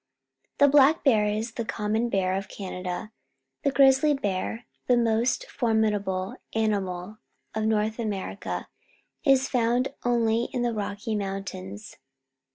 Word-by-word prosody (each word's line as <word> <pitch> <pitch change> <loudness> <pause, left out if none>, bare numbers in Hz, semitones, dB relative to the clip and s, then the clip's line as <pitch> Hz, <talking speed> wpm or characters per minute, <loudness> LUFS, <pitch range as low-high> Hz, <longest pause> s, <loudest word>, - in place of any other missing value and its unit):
The 285 - +6
black 285 +2 +5
bear 220 -7 +4
is 215 +2 -2
the 230 - -4
common 220 +2 -1
bear 190 -3 +1
of 195 0 -3
Can 195 -1 -7
ada; 180 +3 -5 0.5
the 285 - +2
grizzly 275 +2 +5
bear, 205 0 -3 0.2
the 245 - +4
most 235 - +1
formidable 210 -6 0 0.2
animal 205 -2 -1 0.3
of 220 0 -1
North 220 +1 0
Amer 210 -4 -3
ica, - - -4 0.6
is 270 -2 +4
found 245 +1 +1
only 235 -1 +2
in 245 - 0
the 240 -1 0
Rocky 210 +1 -3
Mountains. 195 0 -5
220 Hz, 135 wpm, -26 LUFS, 200-240 Hz, 0.6 s, The